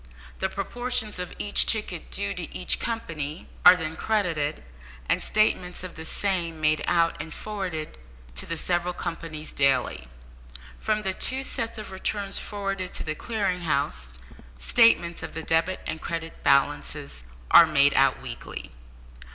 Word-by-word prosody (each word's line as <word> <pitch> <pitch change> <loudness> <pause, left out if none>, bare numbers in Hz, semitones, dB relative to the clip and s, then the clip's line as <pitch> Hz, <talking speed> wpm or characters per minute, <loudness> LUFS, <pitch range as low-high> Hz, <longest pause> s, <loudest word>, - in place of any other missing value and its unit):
The 190 - 0
proportions 215 +1 -2
of 180 - -4
each 205 - +2
ticket 215 -2 -1
due - - -1
to - - -6
each - - +1
company 165 -9 -4 0.2
are 180 +1 +10
then 160 -2 -4
credited, 165 -8 0 0.4
and - - +2
statements 185 -4 +1
of 185 - -6
the 160 - -8
same 170 -4 -1
made 155 0 +2
out 165 -2 +2
and 160 +1 -8
forwarded 180 - -5 0.3
to - - -3
the 165 - -2
several 175 +1 0
companies 165 -3 -5
daily. 130 - +2 0.7
From 215 0 0
the 190 -1 0
two 260 +7 0
sets 230 -4 -2
of 215 -2 -7
returns 195 +1 -2
forwarded 195 -3 -3
to - - -1
the 155 - -2
Clearing 200 0 -1
House, 65 - -1 0.4
statements 170 - +4
of - - -6
the 160 - -4
debit 165 +4 +1
and 160 - -4
credit 165 -1 -5
balances 140 - +1 0.3
are - - +10
made - - +4
out - - +4
weekly. - - -6
175 Hz, 150 wpm, -26 LUFS, 155-200 Hz, 0.7 s, are